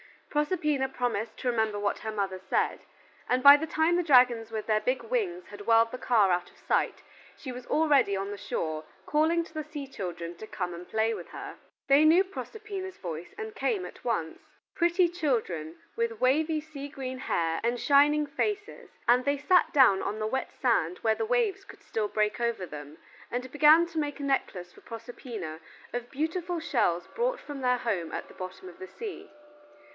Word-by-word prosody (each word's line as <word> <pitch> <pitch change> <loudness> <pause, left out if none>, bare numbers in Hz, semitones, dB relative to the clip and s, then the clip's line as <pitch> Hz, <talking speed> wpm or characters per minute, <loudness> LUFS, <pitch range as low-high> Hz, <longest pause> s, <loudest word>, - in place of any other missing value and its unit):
Proserpina 295 -3 +1
promised 245 -4 -2
to 255 - -1
remember 220 -3 0
what 205 0 -1
her 220 - -4
mother 195 -3 -2
said, 190 - 0 0.5
and 255 +1 +1
by 280 0 +11
the 320 +2 -4
time 320 +3 +2
the - - +3
dragons 250 -7 +5
with 220 -1 -4
their 215 -1 +2
big 255 +4 -1
wings 400 -7 -2
had 205 0 -11
whirled 230 0 +5
the 255 - -5
car 215 -6 +3
out 175 0 0
of - - -24
sight - - 0 0.3
she 260 - -7
was 250 0 -9
already 285 -10 +3
on 195 +1 -3
the 205 - -5
shore, 155 -4 -3 0.2
calling 320 +3 +2
to 330 - -15
the 310 -1 -3
sea 300 -2 -7
children 175 -9 -6
to 220 - -9
come 180 -4 -3
to 175 +1 -9
play 220 +1 +1
with - - -7
her. - - -8 0.3
They 280 +2 +6
knew 335 +5 +6
Proserpina's 390 -1 -7
voice 170 -1 -7
and 440 -1 -6
came 420 -3 -1
at - - -11
once: 170 -10 -1 0.3
pretty 345 +1 +3
children 225 - -2 0.2
with 465 -1 -1
wavy 310 +4 +2
sea 295 -2 -8
green 260 -2 -6
hair 165 -9 0
and 240 +1 0
shining 295 +2 +4
faces, 410 +8 -3 0.2
and 245 +2 +5
they 285 0 +2
sat 320 +3 +3
down 245 -10 +6
on 210 - -3
the 215 - -2
wet 265 +4 -2
sand 180 -9 +1
where 220 -1 +2
the 330 - -2
waves 435 -5 0
could - - -14
still 215 -2 -2
break 210 +1 0
over 235 -5 -1
them, 150 -1 -9 0.3
and 250 +1 -4
began 310 +3 +6
to 330 -2 -4
make 290 -1 -3
a - - -5
necklace 190 -10 -1
for - - -17
Proserpina 225 -8 -7 0.3
of 245 0 -4
beautiful 335 +4 -2
shells 175 - +1
brought - - 0
from 290 -2 -8
their 250 -1 +2
home 195 -9 -2
at - - -5
the - - -13
bottom 185 0 -8
of 175 - -15
the 185 - -7
sea. 430 - -8
255 Hz, 195 wpm, -28 LUFS, 210-315 Hz, 0.5 s, by